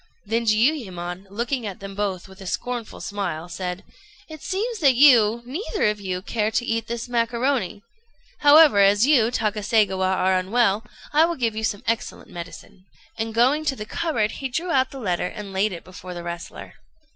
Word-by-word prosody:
Then 230 +3 -1
Jiuyémon, 200 - 0
looking 235 +3 -2
at 195 - -7
them 195 0 -8
both 195 -3 -3
with 190 0 -15
a 190 - -8
scornful 240 +5 -4
smile, 180 -6 -4
said 180 +2 -5 0.4
"It 310 -2 -10
seems 430 +4 -3
that 275 -6 +4
you, 235 -4 +6
neither 375 - -2
of 210 -1 -8
you, 185 -1 -4
care 215 0 -1
to 240 +2 -1
eat 230 -1 -1
this 235 +1 -4
macaroni; 235 -3 -1 0.6
however, 290 -6 +7
as 200 +3 +5
you, 260 -6 +4
Takaségawa, 210 -4 +1
are 190 0 +2
unwell, 205 +2 +1 0.3
I 310 +2 +6
will 340 0 -2
give 230 -5 -1
you 220 - -3
some 205 -2 -2
excellent 230 0 -3
medicine;" 175 +2 -10 0.3
and 225 0 -2
going 255 +7 +3
to 275 - 0
the 210 - -6
cupboard, 240 -7 -1
he 270 - -5
drew 335 +7 -2
out 260 -3 +2
the 275 - -10
letter, 180 -6 -1
and 205 -1 -8
laid 200 +3 +1
it 175 - -7
before 180 0 -10
the 175 - -6
wrestler. 170 0 -8
220 Hz, 180 wpm, -23 LUFS, 195-255 Hz, 0.6 s, however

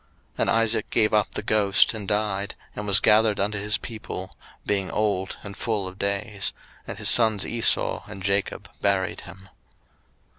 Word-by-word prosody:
01:035:029 - - -21
And - - +2
Isaac 115 -1 +1
gave 110 -2 +2
up 105 -1 +2
the - - -3
ghost, 105 0 +3
and 105 -3 -6
died, 105 -1 -1 0.2
and 105 0 -5
was 100 - +4
gathered 110 -1 +3
unto 105 +1 0
his 105 -1 +1
people, 100 -3 -7 0.3
being 100 -2 0
old 100 -3 -1
and 100 -1 -8
full 105 -4 -2
of 95 +1 -10
days: 100 0 -1 0.3
and - - -6
his - - -3
sons 110 -4 +4
Esau 115 -1 +1
and 100 -2 -9
Jacob 100 +1 -1
buried 95 -2 0
him. 95 0 -13
105 Hz, 170 wpm, -24 LUFS, 100-110 Hz, 0.3 s, was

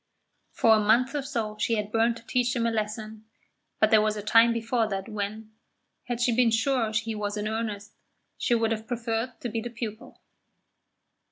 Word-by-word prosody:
For 225 - +4
a 220 - +4
month 235 +6 +3
or 290 - -1 0.2
more 215 -1 -4
she 230 +2 +1
had 210 -1 -3
burned 230 +1 +2
to 230 - -15
teach 250 +1 0
him 235 -1 0
a 230 - +1
lesson, 215 0 -4 0.5
but 215 - +3
there 220 -1 +6
was 215 0 0
a 205 - -5
time 230 +2 +5
before 230 0 0
that 195 -2 -4
when, 215 0 -5 0.5
had 245 -1 -3
she 240 -1 +2
been 245 -1 +4
sure 225 0 +1
he 225 +1 -1
was 210 0 -3
in 210 +1 -2
earnest, 215 -2 -4 0.4
she 240 - +1
would 225 -1 +1
have 220 0 -3
preferred 235 0 -3
to - - -3
be 225 0 -3
the 240 - -5
pupil. 230 -2 -7
225 Hz, 195 wpm, -27 LUFS, 215-235 Hz, 0.5 s, there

